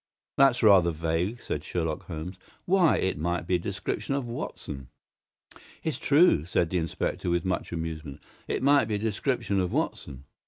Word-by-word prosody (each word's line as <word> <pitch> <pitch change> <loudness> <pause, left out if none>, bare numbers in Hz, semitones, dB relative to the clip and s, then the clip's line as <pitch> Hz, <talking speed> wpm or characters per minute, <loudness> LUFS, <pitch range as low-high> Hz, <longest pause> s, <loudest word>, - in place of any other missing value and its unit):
"That's 135 -3 +4
rather 95 -5 +6
vague," 85 +7 -1
said 75 - -3
Sherlock 80 -3 -3
Holmes. 85 +2 -6 0.3
"Why, 180 -3 +4
it 95 -5 -1
might 85 +2 -1
be 90 - -1
a - - -8
description 100 +8 -3
of 140 -3 -2
Watson!" 75 - -6 1.0
"It's 160 -3 -2
true," 150 - +4
said 85 0 0
the 90 - +1
inspector, 80 +2 -2
with 85 0 0
much 95 - -2
amusement. 80 -4 -5 0.3
"It - - -2
might 140 -4 +5
be 110 -1 -2
a - - 0
description 105 0 -1
of 90 -1 0
Watson." 70 -2 -3
90 Hz, 165 wpm, -27 LUFS, 80-115 Hz, 1.0 s, rather